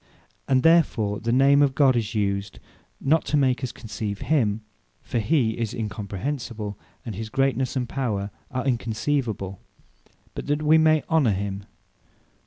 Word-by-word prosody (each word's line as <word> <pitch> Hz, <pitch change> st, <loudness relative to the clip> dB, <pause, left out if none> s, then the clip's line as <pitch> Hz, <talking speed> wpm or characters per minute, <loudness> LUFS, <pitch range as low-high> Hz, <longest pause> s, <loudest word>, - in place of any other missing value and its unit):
And 130 Hz, -1 st, +3 dB
therefore 130 Hz, -11 st, +3 dB
the 115 Hz, -, -1 dB
Name 135 Hz, +3 st, +5 dB
of 140 Hz, -2 st, +3 dB
GOD 135 Hz, -3 st, +4 dB
is 110 Hz, -1 st, -2 dB
used, 100 Hz, -1 st, -1 dB, 0.4 s
not 155 Hz, +4 st, +2 dB
to 150 Hz, -, +1 dB
make 130 Hz, -2 st, +2 dB
us 130 Hz, -, -2 dB
conceive 105 Hz, -3 st, -5 dB
him; 115 Hz, -8 st, +1 dB, 0.4 s
(for 120 Hz, -, -2 dB
he 120 Hz, 0 st, +2 dB
is 115 Hz, 0 st, -3 dB
Incomprehensible; 105 Hz, +1 st, -4 dB, 0.3 s
and 115 Hz, -, -4 dB
his 110 Hz, +3 st, -5 dB
greatnesse, 135 Hz, +1 st, 0 dB
and 125 Hz, -2 st, -1 dB
power 105 Hz, -7 st, -2 dB, 0.2 s
are 130 Hz, -3 st, -3 dB
unconceivable;) 115 Hz, -5 st, -1 dB, 0.7 s
but -, -, -6 dB
that 145 Hz, +1 st, 0 dB
we 155 Hz, +1 st, +5 dB
may 155 Hz, -1 st, +4 dB
honour 145 Hz, -10 st, +3 dB
him. 100 Hz, 0 st, -4 dB
120 Hz, 150 wpm, -24 LUFS, 105-140 Hz, 0.7 s, Name